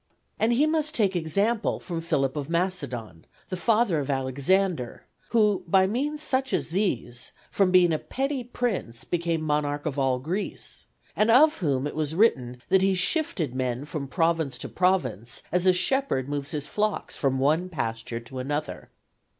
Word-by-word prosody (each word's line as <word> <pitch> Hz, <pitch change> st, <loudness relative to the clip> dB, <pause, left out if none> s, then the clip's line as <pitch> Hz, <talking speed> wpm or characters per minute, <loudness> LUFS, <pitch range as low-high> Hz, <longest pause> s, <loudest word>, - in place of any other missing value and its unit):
And 225 Hz, +2 st, +2 dB
he 260 Hz, +6 st, +3 dB
must 310 Hz, -1 st, +1 dB
take 200 Hz, -4 st, +2 dB
example 200 Hz, +8 st, 0 dB
from 170 Hz, -3 st, -5 dB
Philip 140 Hz, -5 st, 0 dB
of 145 Hz, 0 st, -4 dB
Macedon, 140 Hz, -, -2 dB, 0.3 s
the 185 Hz, -, -2 dB
father 215 Hz, -3 st, +2 dB
of 140 Hz, -1 st, -4 dB
Alexander, 140 Hz, +3 st, 0 dB, 0.2 s
who 210 Hz, -5 st, +2 dB
by 190 Hz, +2 st, +4 dB
means 290 Hz, +9 st, -1 dB
such 265 Hz, -2 st, +1 dB
as -, -, 0 dB
these, 145 Hz, -, -2 dB, 0.2 s
from 195 Hz, -2 st, +3 dB
being 180 Hz, -2 st, +5 dB
a 155 Hz, -, 0 dB
petty 270 Hz, 0 st, -3 dB
prince 225 Hz, -, -3 dB
became 170 Hz, -2 st, -1 dB
monarch 150 Hz, -1 st, -1 dB
of 140 Hz, -, -2 dB
all 130 Hz, -2 st, +2 dB
Greece; 170 Hz, +11 st, -4 dB, 0.3 s
and 215 Hz, +2 st, +2 dB
of 300 Hz, +7 st, +6 dB
whom 140 Hz, -7 st, 0 dB
it 145 Hz, -, -4 dB
was 155 Hz, 0 st, -2 dB
written 125 Hz, -, +1 dB
that 190 Hz, -, +4 dB
he 190 Hz, 0 st, +3 dB
shifted 180 Hz, -, 0 dB
men 130 Hz, +1 st, -2 dB
from 150 Hz, -2 st, -5 dB
province 165 Hz, -2 st, 0 dB
to -, -, -5 dB
province 130 Hz, -, 0 dB
as 180 Hz, +1 st, +2 dB
a -, -, +8 dB
shepherd 180 Hz, -, +1 dB
moves 145 Hz, -1 st, -3 dB
his 150 Hz, -2 st, -2 dB
flocks 210 Hz, +4 st, -2 dB
from 135 Hz, -2 st, 0 dB
one 155 Hz, +7 st, +1 dB
pasture 115 Hz, -6 st, -3 dB
to 130 Hz, +2 st, -8 dB
another. 145 Hz, +4 st, -4 dB
165 Hz, 165 wpm, -26 LUFS, 135-205 Hz, 0.3 s, a